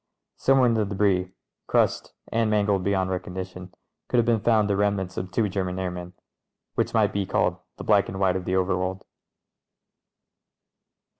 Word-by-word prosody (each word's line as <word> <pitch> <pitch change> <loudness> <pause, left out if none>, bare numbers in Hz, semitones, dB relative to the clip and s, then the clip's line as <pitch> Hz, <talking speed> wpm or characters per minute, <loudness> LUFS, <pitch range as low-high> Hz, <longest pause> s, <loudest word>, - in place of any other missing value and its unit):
Somewhere 135 -1 +4
in 120 - +3
the 110 -1 +2
debris, 95 -2 +1 0.4
crushed - - +1 0.2
and 115 -1 +1
man 105 -1 +2
gled 100 -3 +1
beyond 95 -1 0
recognition, 90 0 -5 0.4
could 125 - 0
have 120 - +4
been 115 -2 +2
found 110 -1 +3
the 100 - +1
remnants 100 -2 0
of 90 +1 -4
two 105 +4 +1
German 95 -2 -2
airmen. 90 -1 -4 0.6
Which - - -1
might - - +3
be 100 -2 -1
called - - +1 0.2
the - - -7
black - - +3
and 95 - -5
white 95 -2 +2
of 95 -1 -3
the 90 - -1
ovefworld. 95 0 0
95 Hz, 165 wpm, -25 LUFS, 90-105 Hz, 0.6 s, Somewhere